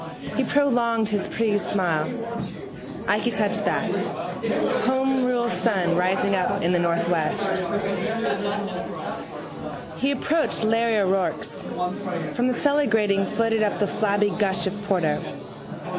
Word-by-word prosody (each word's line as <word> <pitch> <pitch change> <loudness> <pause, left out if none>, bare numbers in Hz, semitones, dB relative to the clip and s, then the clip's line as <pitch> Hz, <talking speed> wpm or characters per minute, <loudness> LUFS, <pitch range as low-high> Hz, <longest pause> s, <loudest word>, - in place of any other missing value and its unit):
He - - +2
prolonged 235 -6 +2
his 205 -2 0
pleased 215 -2 0
smile. 170 -6 +1 1.0
Ikey - - +2
touch - - +1
that: - - +1 1.0
homerule 260 -2 +2
sun 185 -7 +1
rising 185 +2 +2
up 185 -3 +1
in 170 - +3
the 175 - +3
northwest. 170 +3 +1 2.4
He 270 - +1
approached 290 0 +1
Larry 225 0 +2
O'Rourke's. 195 -2 0 0.7
From 245 +1 +1
the 255 - +2
cellar 290 +2 +2
grating 200 -4 +2
floated 225 0 +1
up 210 -1 +1
the 205 - +2
flabby 205 0 +1
gush 195 -2 +1
of 190 - -1
porter. 175 -7 +1
210 Hz, 115 wpm, -24 LUFS, 190-235 Hz, 2.4 s, in